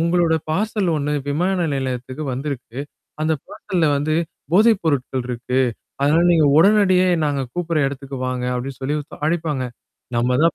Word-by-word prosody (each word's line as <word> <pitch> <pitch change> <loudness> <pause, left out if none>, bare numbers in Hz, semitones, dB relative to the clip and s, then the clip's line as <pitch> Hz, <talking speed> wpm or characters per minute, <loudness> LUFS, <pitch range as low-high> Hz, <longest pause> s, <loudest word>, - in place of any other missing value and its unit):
உங்களோட 170 0 +2 0.2
பார்சல் 205 +2 0
1 145 0 -1 0.2
விமான 175 +4 +1
நிலையத்துக்கு 130 +1 -3
வந்திருக்கு. 130 -2 -5 0.4
அந்தப் 155 -3 0
பார்சல்ல 175 -4 -1
வந்து 155 +2 0 0.4
போதைப் 215 +2 +5
பொருட்கள் 135 -5 0
இருக்கு. 125 +2 -1 0.4
அதனால 155 +4 +4
நீங்க 160 -3 +4
உடனடியா 185 -1 +5 0.2
நாங்க 140 -2 0
கூப்பிடுற 170 -2 -1
இடத்துக்கு 135 0 -5
வாங்க. 125 -1 -2
அப்பிடின்னு 130 +1 -5
சொல்லி 135 +3 -1
ஒருத் 145 - -12
அழைப்பாங்க. 155 -5 -1 0.5
நம்ம 125 +2 +2
தான் 165 - +4
150 Hz, 140 wpm, -21 LUFS, 130-170 Hz, 0.5 s, போதைப்